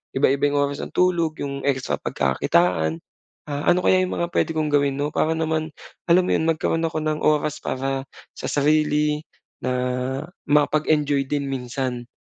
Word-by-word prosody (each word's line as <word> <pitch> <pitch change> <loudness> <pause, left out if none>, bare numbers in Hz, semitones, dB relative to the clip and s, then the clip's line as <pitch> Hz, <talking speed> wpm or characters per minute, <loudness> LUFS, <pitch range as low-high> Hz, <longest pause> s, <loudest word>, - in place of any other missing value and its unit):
iba-iba 140 +1 +3
yung 145 - 0
oras 140 - -6
ng - - -8
tulog, 170 -3 +2
'yong 140 -1 -4
extra 130 - 0
pagkakakitaan. 80 +4 +1 0.5
Ah, 145 0 -1
ano 180 +1 +3
kaya 185 - +5
yung 185 - -2
mga 170 - +1
puwede - - +1
kong 155 -1 0
gawin 140 -1 +3
'no, 145 +1 -1
para 160 - +1
naman 160 -1 -1 0.4
alam 180 +2 +5
mo - - -1
'yun, 160 - 0
magkaro'n 165 +1 0
ako 160 - -3
ng 155 0 -1
oras 150 0 +1
para 135 +1 -2 0.4
sa - - -4
sarili, 150 0 +2 0.4
na 130 - -1 0.8
makapag-enjoy 150 -1 +2
din 145 -1 -1
minsan? 125 -1 -3
145 Hz, 160 wpm, -23 LUFS, 135-155 Hz, 0.8 s, kaya